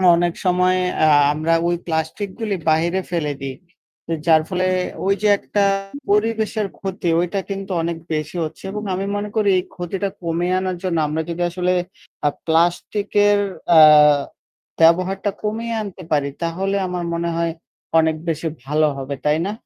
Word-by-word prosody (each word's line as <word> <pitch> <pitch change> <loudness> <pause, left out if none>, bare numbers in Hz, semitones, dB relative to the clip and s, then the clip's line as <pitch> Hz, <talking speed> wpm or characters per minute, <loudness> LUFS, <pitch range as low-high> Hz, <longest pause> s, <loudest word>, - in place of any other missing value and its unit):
অনেক 175 0 +1
সময় 180 0 +3 0.3
আ - - +5 0.3
আমরা 160 +2 0
ওই 175 - +1
প্লাস্টিকগুলি 195 +6 -2
বাহিরে 170 +4 +2
ফেলে 150 -4 -1
দিই। 135 -1 -5 0.7
যার 160 -1 +6
ফলে 185 0 0 0.4
ওই 195 - +3
যে 210 - +2
একটা 205 - 0 0.5
পরিবেশের 215 0 +1
ক্ষতি 190 -3 -3
ওইটা 180 +3 -1
কিন্তু 195 0 -5
অনেক 170 0 -2 0.2
বেশি 155 +2 -3
হচ্ছে 155 - -7
এবং 210 +1 -5
আমি 190 +2 -2
মনে 205 0 -3
করি 210 -2 +2
এই - - -4
ক্ষতিটা 190 +2 -3
কমিয়ে 175 +2 0
আনার 185 -1 -2
জন্য 180 -3 0
আমরা 155 +2 -1
যদি 170 +1 -4
আসলে 180 +1 0 0.5
আ - - +5 0.2
প্লাস্টিকের 205 +5 +2 0.3
অ্যা 165 -2 +8 1.0
ব্যবহারটা 185 +4 +3
কমিয়ে 225 +2 -2
আনতে 195 -3 -8
পারি 140 -2 +1
তাহলে 190 +4 -1
আমার 180 -1 -3
মনে 170 0 -1
হয় 170 -1 0 0.5
অনেক 160 0 +2
বেশি 160 +1 -2 0.2
ভালো 150 +2 +2
হবে। 135 +1 -4
তাই 150 +2 +3
না? 200 - -2
180 Hz, 155 wpm, -20 LUFS, 165-195 Hz, 1.0 s, অ্যা